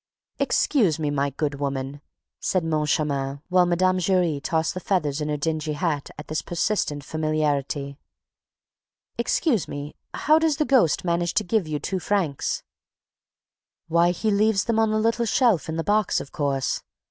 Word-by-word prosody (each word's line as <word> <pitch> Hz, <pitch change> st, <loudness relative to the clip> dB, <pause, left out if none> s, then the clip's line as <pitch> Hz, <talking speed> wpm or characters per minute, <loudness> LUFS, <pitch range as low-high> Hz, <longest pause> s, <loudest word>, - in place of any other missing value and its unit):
"Excuse 205 Hz, -, +2 dB
me, 150 Hz, -2 st, -1 dB
my 140 Hz, 0 st, 0 dB
good 145 Hz, 0 st, -3 dB
woman," 140 Hz, 0 st, -3 dB, 0.4 s
said 185 Hz, -2 st, 0 dB
Moncharmin, 150 Hz, -3 st, 0 dB
while 180 Hz, -1 st, +4 dB
Mme. 185 Hz, +1 st, +2 dB
Giry 175 Hz, -5 st, +1 dB
tossed 160 Hz, +1 st, 0 dB
the 185 Hz, -, -4 dB
feathers 155 Hz, -7 st, 0 dB
in 150 Hz, -, -2 dB
her 150 Hz, -, 0 dB
dingy 155 Hz, +1 st, -2 dB
hat 150 Hz, -2 st, -2 dB
at 150 Hz, -, -9 dB
this 155 Hz, -, -2 dB
persistent 170 Hz, -5 st, -1 dB
familiarity, 150 Hz, -2 st, -1 dB, 1.2 s
"excuse 235 Hz, -, +1 dB
me, 145 Hz, +1 st, -6 dB, 0.2 s
how 310 Hz, +1 st, +4 dB
does 320 Hz, -3 st, +1 dB
the 300 Hz, -, +1 dB
ghost 235 Hz, -, +3 dB
manage 170 Hz, 0 st, 0 dB
to 215 Hz, -, +3 dB
give 205 Hz, -2 st, 0 dB
you 155 Hz, -, -5 dB
your 150 Hz, -, -2 dB
two 190 Hz, -, -2 dB
francs?" 175 Hz, -8 st, -1 dB, 1.3 s
"Why, 170 Hz, +1 st, +4 dB
he 210 Hz, +5 st, 0 dB
leaves 205 Hz, 0 st, +3 dB
them 230 Hz, -1 st, 0 dB
on 220 Hz, -1 st, +3 dB
the 215 Hz, -, +1 dB
little 230 Hz, +2 st, +1 dB
shelf 220 Hz, -, +2 dB
in 160 Hz, -, -2 dB
the 165 Hz, -, -1 dB
box, 210 Hz, 0 st, +2 dB
of -, -, -8 dB
course. 140 Hz, -2 st, -1 dB
165 Hz, 165 wpm, -24 LUFS, 145-200 Hz, 1.3 s, while